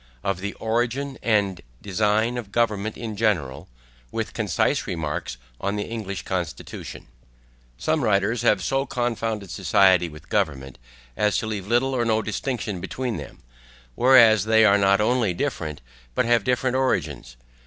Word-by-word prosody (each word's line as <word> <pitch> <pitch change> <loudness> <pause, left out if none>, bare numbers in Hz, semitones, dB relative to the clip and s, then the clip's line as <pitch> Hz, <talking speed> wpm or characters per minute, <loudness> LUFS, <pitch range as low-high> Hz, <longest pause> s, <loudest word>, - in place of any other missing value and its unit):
OF 100 -2 -1
THE 100 +2 -4
ORIGIN 120 +5 -2
AND 100 -6 +1 0.2
DESIGN 105 +4 +1
OF 105 -4 -9
GOVERNMENT 110 -2 0
IN 110 -3 -5
GENERAL, 90 - -1 0.4
WITH - - -3
CONCISE - - 0
REMARKS 75 -7 -3 0.2
ON 100 +1 -2
THE 105 +2 -4
ENGLISH 100 -4 -4
CONSTITUTION 90 -4 -5 0.7
SOME 155 - 0
writers 105 +1 +1
have 105 -6 +2
so 135 +9 0
confounded 115 -5 -2
society 95 -2 +3
with 75 +1 -13
government, 70 -9 -2 0.4
as 105 -1 +1
to - - -2
leave 105 -3 -4
little 125 +4 +2
or 120 - +1
no 110 -1 +1
distinction 110 -3 -3
between 120 +5 -3
them; - - -10 0.5
whereas 115 - +6
they 110 0 +5
are 100 -1 +5
not 100 0 +4
only 110 -4 +1
different, 75 -3 -3 0.3
but - - +2
have 120 -2 +3
different 125 +1 0
origins. 130 - -1
105 Hz, 145 wpm, -24 LUFS, 95-120 Hz, 0.7 s, whereas